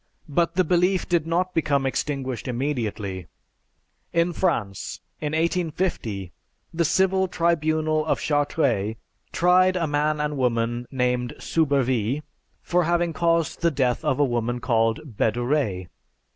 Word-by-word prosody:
But 165 +3 0
the 185 - +4
belief 180 +2 +2
did 170 -3 +1
not 180 +2 0
become 140 -4 +1
extinguished 135 -3 -2
immediately. 115 - -3 0.8
In 170 +1 +1
France, 115 - -1 0.2
in 150 0 -3
1850, 160 - -1 0.4
the 170 +1 +1
Civil 190 +3 +2
Tribunal 155 -2 +1
of - - +1
Chartres 140 -8 0 0.4
tried 185 +1 +4
a 175 -2 +1
man 150 0 0
and 150 -1 -1
woman 120 -1 0
named 125 -2 -1
Soubervie 135 -4 0 0.4
for 180 -1 +1
having 170 0 +1
caused 165 -1 +1
the 170 - +4
death 130 -5 0
of 145 -3 0
a 145 - +5
woman 120 -1 -1
called 115 -3 +1
Bedouret. 120 -4 -1
145 Hz, 125 wpm, -24 LUFS, 120-170 Hz, 0.8 s, a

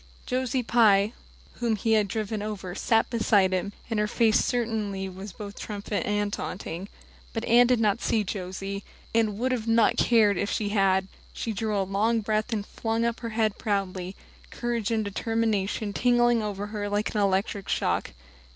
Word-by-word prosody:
Josie 255 0 -1
Pye, 215 -3 +4 0.5
whom 235 -2 +1
he 225 +2 -1
had 215 -2 +4
driven 215 +1 -3
over, 205 -4 -5
sat 225 +4 +2
beside 205 -5 +3
him, 185 +2 -1 0.2
and 225 -2 -1
her 210 - +2
face 225 0 +3
certainly 215 -5 -1
was 190 +2 -8
both 205 +1 -9
triumphant 205 0 -3
and 205 0 0
taunting. 180 +1 -5 0.4
But 225 - -3
Anne 240 +1 +6
did 250 -2 +3
not 210 -3 +2
see 220 - +1
Josie, 195 0 -5 0.3
and 220 -3 +2
would 245 -1 -1
not 225 -1 +4
have - - +3
cared 215 -5 +4
if 200 - -1
she 205 -1 -1
had. 195 -2 +2 0.3
She 225 - -3
drew 215 0 -1
a 195 - +2
long 215 +4 +1
breath 215 +2 -1
and 210 -3 -1
flung 225 +1 -2
her 235 0 -2
head 220 -1 +1
up - - -23
proudly, 190 -3 -2 0.3
courage 235 -3 -2
and 220 -2 0
determination 210 -1 -1
tingling 240 -1 +3
over 205 -1 -3
her 205 -1 -2
like 205 +1 -1
an 210 - +1
electric 195 0 0
shock. - - 0
210 Hz, 175 wpm, -27 LUFS, 200-225 Hz, 0.5 s, Anne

